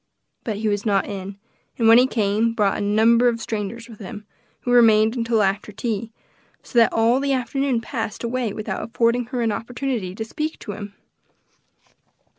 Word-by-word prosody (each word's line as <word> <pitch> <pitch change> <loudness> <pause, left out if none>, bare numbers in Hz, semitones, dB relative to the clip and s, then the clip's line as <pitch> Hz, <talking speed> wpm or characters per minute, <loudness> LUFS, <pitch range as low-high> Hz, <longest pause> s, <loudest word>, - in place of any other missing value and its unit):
But 220 -3 -3
he 215 +1 -2
was 205 -1 0
not 200 -4 +1
in, 195 0 -6 0.4
and 230 - +2
when 225 +1 +8
he 255 - +4
came, 220 -1 +1
brought 205 -4 +2
a - - -3
number 225 +4 +4
of 235 -1 +1
strangers 220 +1 -4
with 225 -3 -13
him, 210 +1 -8 0.4
who 245 - -2
remained 225 -2 +5
until 230 -2 +1
after 200 +2 -1
tea; 220 +1 -3 0.5
so 240 - +1
that 230 - +5
all 230 +3 +3
the 275 0 0
afternoon 265 -1 0
passed 225 -2 -5
away 235 -1 -1
without 215 +1 -4
affording 235 +1 +1
her 245 0 -3
an 225 - +1
opportunity 235 -4 -3
to 220 - -4
speak 305 +7 -4
to 210 - -7
him. 205 0 -8
225 Hz, 180 wpm, -22 LUFS, 210-240 Hz, 0.5 s, when